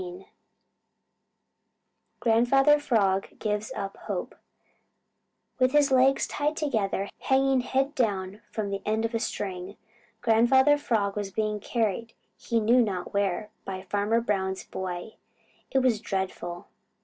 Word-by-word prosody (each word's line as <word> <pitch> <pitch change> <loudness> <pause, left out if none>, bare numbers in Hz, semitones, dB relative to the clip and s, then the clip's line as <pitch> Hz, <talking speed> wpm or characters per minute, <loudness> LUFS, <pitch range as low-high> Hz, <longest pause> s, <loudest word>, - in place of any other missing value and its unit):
XV 180 +1 -8 2.0
GRANDFATHER 270 +6 +4
FROG 200 -8 +1
GIVES 210 0 -2
UP 195 -1 -4
HOPE - - -3 1.3
With 255 +1 +3
his 290 -2 +4
legs 265 +1 +4
tied 300 +1 -2
together, 215 -9 -1
hanging 270 -1 +2
head 270 +3 0
down 205 -5 -1
from 210 -3 -3
the 195 0 -3
end 220 +1 0
of 230 - -3
a 230 - 0
string, 190 -3 -4 0.4
Grandfather 265 +5 +4
Frog 210 -7 0
was 205 -1 -3
being 210 +1 -1
carried 225 +1 -2 0.2
he 230 -1 -1
knew 235 +3 +4
not 195 -6 -2
where 200 +1 -1
by 190 -1 -6
Farmer 205 +3 +1
Brown's 190 -4 -1
boy. 185 +2 -6 0.5
It 265 - +2
was 235 -5 +2
dreadful. 190 -4 -4
215 Hz, 125 wpm, -27 LUFS, 195-255 Hz, 2.0 s, GRANDFATHER